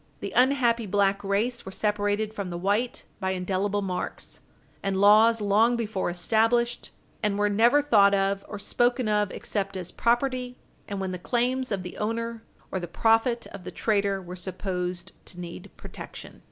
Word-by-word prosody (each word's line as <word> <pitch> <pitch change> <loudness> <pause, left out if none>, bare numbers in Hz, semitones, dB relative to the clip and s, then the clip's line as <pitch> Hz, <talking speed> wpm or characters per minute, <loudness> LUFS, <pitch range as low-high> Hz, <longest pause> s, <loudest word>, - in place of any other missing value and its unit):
The - - -5
unhappy 245 -3 +3
black 200 0 +1
race 215 +5 0
were 190 - -8
separated 210 +1 0
from 200 -4 -4
the 175 - -4
white 205 +7 -1
by 190 -1 -1
indelible 190 +2 -1
marks, 180 -2 -4 0.4
and 195 -1 -1
laws 215 +3 +6
long 215 +4 +3
before 220 -6 -2
established, 225 +6 +1 0.3
and 210 -2 +1
were 205 0 +2
never 235 +8 +4
thought 200 -7 +5
of 195 0 0
or 205 - -5
spoken 240 +3 +1
of 210 -1 +2
except 195 -1 -3
as 180 -2 -5
property, 250 +1 0 0.3
and 200 -1 -4
when 190 -1 -2
the 180 - -5
claims 250 +5 0
of 195 -3 -1
the 180 - -8
owner 230 +1 -2 0.3
or 190 - -1
the 175 - -5
profit 225 +6 +2
of 200 -2 -9
the - - -6
trader 200 -3 0
were 180 -1 -8
supposed 180 0 -4 0.2
to 180 - -8
need 170 -1 -8
protection. - - -10
205 Hz, 165 wpm, -26 LUFS, 190-230 Hz, 0.4 s, laws